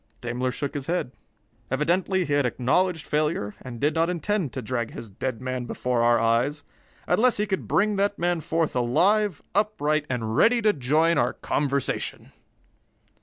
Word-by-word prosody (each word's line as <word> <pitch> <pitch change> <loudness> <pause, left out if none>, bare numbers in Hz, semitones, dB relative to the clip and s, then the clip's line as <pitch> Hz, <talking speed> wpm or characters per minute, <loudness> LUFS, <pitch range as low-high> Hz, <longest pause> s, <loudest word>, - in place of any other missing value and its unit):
Daimler 125 +1 -2
shook 140 +2 -4
his 145 -3 -5
head. 175 -6 -1 0.6
Evidently 175 +7 +1
he 145 - -2
had 145 0 +3
acknowledged 145 +7 +1
failure 150 -9 -1
and 120 -2 -8
did 150 +4 +1
not 165 +1 +1
intend 180 - -1
to 130 - -5
drag 120 -3 -2
his 115 -3 -9
dead 115 +4 -4
man 130 -1 -3
before 125 -1 -1
our 120 0 +4
eyes, 120 +6 +1 0.4
unless 225 +7 +3
he 210 - +1
could 195 -2 -3
bring 210 0 +2
that 200 +1 +1
man 175 0 0
forth 160 -1 -1
alive, 180 - +2
upright, 155 -7 +1
and 115 -3 -2
ready 235 - +4
to 215 -2 +3
join 155 +4 +2
our - - +1
conversation! 140 -2 -2
150 Hz, 165 wpm, -25 LUFS, 125-180 Hz, 0.6 s, our